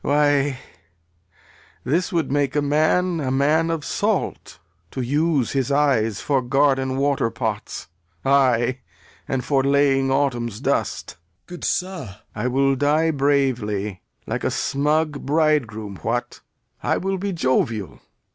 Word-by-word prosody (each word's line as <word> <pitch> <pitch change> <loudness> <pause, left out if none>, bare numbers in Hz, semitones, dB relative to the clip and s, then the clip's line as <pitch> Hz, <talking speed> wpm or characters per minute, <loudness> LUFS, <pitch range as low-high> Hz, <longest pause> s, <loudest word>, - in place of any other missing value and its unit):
Why, 145 -2 +2 1.3
this 165 - 0
would 165 -6 0
make 140 -1 0
a 145 - +3
man 155 +4 +2
a 135 -4 -2
man 150 +5 +2
of 165 -3 -2
salt, - - -2 0.3
To 130 - -4
use 145 +1 +1
his 135 -1 -1
eyes 130 -7 +2
for 140 -3 +1
garden 135 0 +1
waterpots, 115 -6 -1 0.4
Ay, 130 -2 +3 0.5
and 130 -2 -2
laying 135 -1 +3
autumn's 120 -6 0
dust. - - -1
Gent. - - -12 0.3
Good 175 -1 -10
sir 185 0 -1
Lear. 100 -9 -9 0.2
I 110 +4 -2
will 135 +2 +2
die 150 +4 +2
bravely, 125 -9 0 0.2
like - - -3
a - - +1
smug 150 +1 0
bridegroom. 130 -10 0
What! 120 +5 -3 0.4
I - - +1
will 195 0 -2
be 200 +1 -2
jovial. 120 - -1
140 Hz, 130 wpm, -22 LUFS, 125-150 Hz, 1.3 s, a